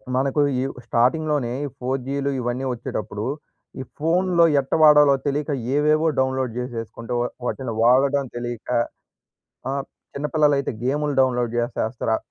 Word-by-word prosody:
మనకు 135 +3 +1 0.2
ఈ - - 0 0.2
స్టార్టింగ్‌లోనే 130 +2 +1
ఈ - - -2
4జీలు 135 +2 -2
ఇవన్నీ 125 +2 -2
వచ్చేటప్పుడు, 105 -2 -5 0.5
ఈ - - -3
ఫోన్‌లో 170 +2 +3
ఎట్టా 135 - -1
వాడాలో 150 -2 +7
తెలియక 145 +1 -1 0.2
ఏవేవో 155 +2 +3
డౌన్‌లోడ్ 130 -2 0
జేసేసుకుంటే, 115 -1 -5
వ - - +1 0.2
వాటిని 125 -4 -3
వాడడం 135 +3 +3
తెలియక 120 -1 -5 1.0
ఆహ్, 140 0 -2 0.3
చిన్నపిల్లలైతే 145 -1 +1
గేమ్‌లు 145 +2 0
డౌన్‌లోడ్ 120 -2 +1
జేసేస్తారు. 120 -1 -1
135 Hz, 115 wpm, -23 LUFS, 120-145 Hz, 1.0 s, వాడాలో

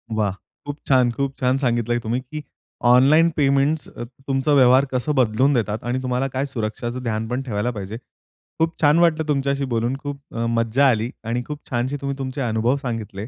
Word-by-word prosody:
वाह! 105 -3 +1 0.3
खूप 145 0 -5
छान, 125 -3 +4
खूप 140 +2 -3
छान 130 0 +1
सांगितलंय 120 -2 0
तुम्ही 115 +2 -2
की 150 +4 -8 0.5
ऑनलाईन 140 +7 +6
पेमेंट्स 140 +2 +2
अ, - - -8 0.2
तुमचा 135 +1 0
व्यवहार 130 0 +6
कसं 135 +4 0
बदलून 130 +2 +3
देतात 110 -3 -1
आणि 125 +2 -2
तुम्हाला 125 +1 0
काय 135 +2 -1
सुरक्षाच 120 -1 -4
ध्यान 110 -1 -2
पण 125 +3 -2
ठेवायला 115 0 -2
पाहिजे. 105 0 -6 0.6
खूप 165 +1 0
छान 150 +2 +5
वाटलं 160 -2 +2
तुमच्याशी 140 -1 0
बोलून 120 +3 0
खूप 145 -1 -5 0.2
अ, 115 0 -1
मज्जा 115 +4 +2
आली 115 0 0
आणि 120 +2 -2
खूप 150 0 -5
छानशी 125 +4 -1
तुम्ही 140 0 -3
तुमचे 135 0 -4
अनुभव 115 +1 +1
सांगितले. 115 -6 -5
130 Hz, 180 wpm, -22 LUFS, 115-140 Hz, 0.6 s, ऑनलाईन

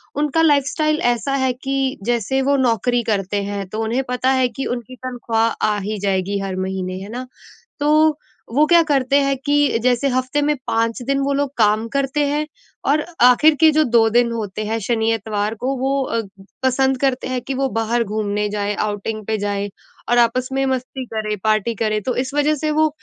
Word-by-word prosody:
उनका 295 +2 +1
लाइफ़स्टाइल 305 0 +2 0.2
ऐसा 275 +4 -3
है 260 - +2
कि 270 +1 -2
जैसे 240 +3 0
वो 280 +1 +2
नौकरी 245 -1 +1
करते 200 0 -1
हैं 200 -1 -4
तो 215 +3 -4
उन्हें 235 +4 -1
पता 250 +1 0
है 255 - +4
कि 270 +3 -5
उनकी 245 +1 -9
तनख़्वाह 235 -3 0 0.2
आ 210 -1 +1
ही 210 +2 -3
जाएगी 195 0 -1
हर 195 -1 -4
महीने, 185 0 -3
है 200 - -8
ना? 250 +3 -6 0.5
तो 305 +1 +3 0.4
वो 295 +3 +5
क्या 340 +1 +6
करते 275 -2 +2
हैं 275 -1 +1
कि, 290 -4 +3
जैसे 250 +2 +2
हफ़्ते 255 +3 0
में 300 +1 +1
5 230 +2 0
दिन 275 0 +1
वो 275 +1 0
लोग 280 0 0
काम 215 0 +3
करते 275 +3 -1
हैं 295 +2 -1 0.4
और 295 +2 +3 0.2
आखिर 250 +6 +6
के 320 -1 +7
जो 310 0 +3
2 230 -3 +4
दिन 240 +1 +3
होते 215 -2 -4
हैं 220 +2 -1
शनि-इतवार 220 -1 -1
को 255 +5 -2
वो 270 +2 0 0.2
अग 220 -3 -4 0.3
पसंद 265 0 +2
करते 265 -2 0
हैं 255 -1 -2
कि 270 - -4
वो 270 +1 0
बाहर 230 0 0
घूमने 210 0 -2
जाएँ, 205 0 -2
आउटिंग 215 +1 -3
पे 220 - 0
जाएँ 205 0 -2 0.4
और 240 - +4
आपस 240 +2 +2
में 270 0 +1
मस्ती 260 0 -3
करें 215 -2 -3
पार्टी 215 +1 +1
करें। 215 0 -1
तो 250 +4 -2
इस 260 +2 -2
वज़ह 295 +1 +2
से 305 +2 -2
वो 310 +1 +3
245 Hz, 195 wpm, -20 LUFS, 215-275 Hz, 0.5 s, के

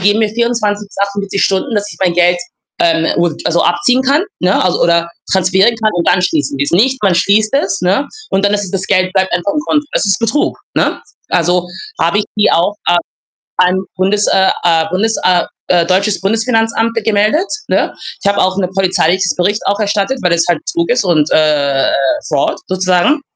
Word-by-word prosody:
geben 205 +3 +2
mir 215 - +2
24 215 -3 -1
bis - - -18
48 200 0 -2
Stunden, 200 +6 -1
dass 205 -1 0
ich 160 - -15
mein 175 -2 +1
Geld, 175 0 +3 0.4
ähm, 165 -1 +2
um 170 -2 0
also, 170 0 +1
abziehen 245 +9 +2
kann, 280 +5 +2 0.2
ne, 185 +1 +1
also 180 - 0
oder 170 0 +2 0.2
transferieren 190 +5 +2
kann 220 -1 0
und 170 - 0
dann 180 0 +3
schließen 145 -5 -1
sie 145 - +1
es. - - -3
Nicht, 255 +8 +2
man 195 -3 +3
schließt 205 +5 +2
es, 195 -8 0
ne, 200 +10 +1 0.2
und 195 +1 0
dann 205 0 +2
ist 205 0 -1
es 185 - -8
das 190 -1 -3
Geld 185 0 +1
bleibt 190 -1 0
einfach 180 +3 -1
im 300 - -1
Konto. 300 -1 +1
Das - - 0
ist 195 -2 +1
Betrug, 230 +6 0 0.2
ne? - - 0 0.3
Also, 175 0 +1 0.3
habe 205 - +1
ich 210 - 0
die 210 - +4
auch 180 +5 +1
a 175 - +3 0.6
ans 185 +1 +2
Bundes 195 +3 +1
äh, 190 0 +3
äh, 165 -2 +2
Bundes 220 +5 0
äh, 180 -1 +3 0.2
äh, 175 -2 +3
deutsches 195 +3 +1
Bundesfinanzamt 225 +2 0
ge 230 - -2
gemeldet, 220 - +1 0.2
ne? - - 0 0.3
Ich - - +1
habe 200 - +1
auch 185 +1 +1
'ne 185 -2 0
polizeiliches 185 -1 +1
Bericht 200 +4 0
auch 200 +1 0
erstattet, 210 +5 -1
weil 180 - +1
es 170 0 +2
halt 170 - +2
Betrug 170 0 -1
ist 245 0 +2
und, 160 -5 +1
äh, 145 -3 +2 0.4
Fraud 145 -2 0
sozusagen 185 - +1
190 Hz, 205 wpm, -14 LUFS, 175-210 Hz, 0.6 s, die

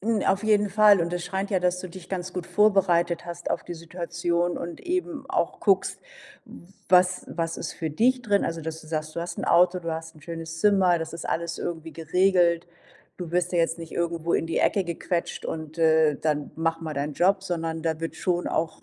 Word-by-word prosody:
Äh, 210 - -9
n 225 -3 +1
auf 195 +2 +2
jeden 210 -1 +3
Fall 210 -1 +6
und 170 +1 -1
es 175 -1 -2
scheint 190 +3 -3
ja, 190 -3 +2
dass 180 0 +1
du 185 - -7
dich 175 0 -11
ganz 185 -1 -4
gut 180 -1 -4
vorbereitet 180 -3 +3
hast 175 0 -6
auf - - -1
die 175 - -7
Situation 170 +1 -2
und 170 0 -6
eben 345 -6 -3
auch - - -1
guckst, - - +2 0.9
was 180 0 +4
was 165 -1 -3
ist - - -5
für 160 -2 -4
dich 245 - +2
drin, 205 -3 +2
also 165 0 -3
dass 160 0 -5
du 155 - -15
sagst: 155 -1 -3
„Du - - -1
hast 170 - -5
'n - - -2
Auto, 180 +1 +4
du 165 -1 -4
hast 165 +1 -6
'n 155 - -17
schönes 165 -1 -6
Zimmer, 190 -4 +4
das 165 0 -5
ist 165 - -6
alles 170 0 -2
irgendwie 165 -1 -5
geregelt, 175 +1 +2 0.5
du 175 -3 -6
wirst 180 +1 0
ja 175 - +1
jetzt 165 0 +1
nicht 165 -1 -9
irgendwo 170 -1 -1
in - - +1
die 165 - -1
Ecke 195 -3 +2
gequetscht 170 +1 -3
und, 160 0 -6
äh, 160 -2 +4
dann 150 -2 -1
mach 165 0 0
mal 160 -2 -5
deinen 145 +2 -2
Job“, 190 +4 +3
sondern 165 -3 -3
da 160 -1 -1
wird 165 - -4
schon 175 -2 0
auch 160 0 -2
170 Hz, 220 wpm, -26 LUFS, 165-185 Hz, 0.9 s, Fall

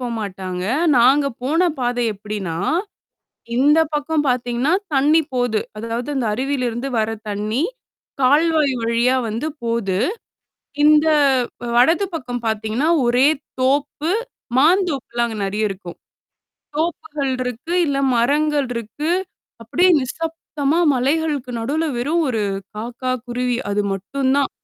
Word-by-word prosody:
போ 250 - -3
மாட்டாங்க. 185 -3 -5 0.3
நாங்க 270 +4 +5 0.2
போன 325 +7 +2
பாதை 245 -1 0
எப்பிடின்னா, 200 -5 -5 1.0
இந்த 290 +4 +5 0.2
பக்கம் 295 +1 0
பாத்தீங்கன்னா, 245 +4 0 0.2
தண்ணீ 295 +4 +4
போது. 245 -3 +1 0.2
அதாவது 230 +4 -4
அந்த 255 -4 0
அருவியில 260 +3 -1
இருந்து 240 +4 -4
வர 220 0 +1 0.2
தண்ணீ. 210 +6 -1 0.6
கால்வாய் 300 +2 +4
வழியா 235 +2 +2
வந்து 230 +7 -3 0.2
போது. 230 -5 -1 0.9
இந்த 305 +1 +6 0.7
வலது 325 +11 +4
பக்கம் 245 -6 -4
பாத்தீங்கன்னா, 220 +6 0 0.2
ஒரே 250 +4 +4 0.3
தோப்பு, 285 +4 0 0.5
மாந்தோப்புலாம் 285 -7 +2
அங்க 220 -2 -6
நறைய 210 +2 0
இருக்கும். 185 -3 -8 0.8
தோப்புகள் 305 -3 -2
இருக்கு, 250 +7 -4
இல்ல 280 -2 0 0.2
மரங்கள் 290 +3 +2
இருக்கு. 235 +8 -3 0.5
அப்பிடியே 350 +11 +3
நிசப்தமா 320 +2 -2
மலைகளுக்கு 280 0 0
நடுவுல 300 +8 -1
வெறும் 315 +7 +1
ஒரு 225 -4 0 0.3
காக்கா, 245 +4 -3
குருவி 245 0 -1
அது 205 +1 +1
மட்டும் 260 +8 -1
தான். 280 - +1
255 Hz, 115 wpm, -20 LUFS, 230-295 Hz, 1.0 s, இந்த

